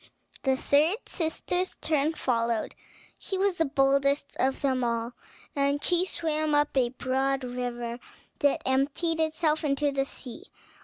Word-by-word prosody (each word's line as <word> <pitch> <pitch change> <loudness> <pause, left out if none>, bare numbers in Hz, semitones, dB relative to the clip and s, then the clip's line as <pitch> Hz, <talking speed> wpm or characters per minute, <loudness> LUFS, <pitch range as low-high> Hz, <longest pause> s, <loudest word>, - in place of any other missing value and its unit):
The 265 -1 +1
third 305 +9 +3
sister's 355 +2 -2
turn 310 0 +1
followed; 230 -4 0 0.5
she 385 - -3
was 385 -2 +1
the 325 - +4
boldest 275 0 +2
of 265 +1 +1
them 260 -2 +1
all, 235 0 -1 0.4
and 280 0 +1
she 355 0 +2
swam 310 -3 0
up 295 0 +2
a 250 -3 +3
broad 265 +2 -1
river 245 -1 -4 0.4
that 285 -2 +2
emptied 285 +5 +1
itself 315 0 +1
into 290 0 +1
the 270 -1 0
sea. 275 - -8
280 Hz, 140 wpm, -28 LUFS, 260-315 Hz, 0.5 s, the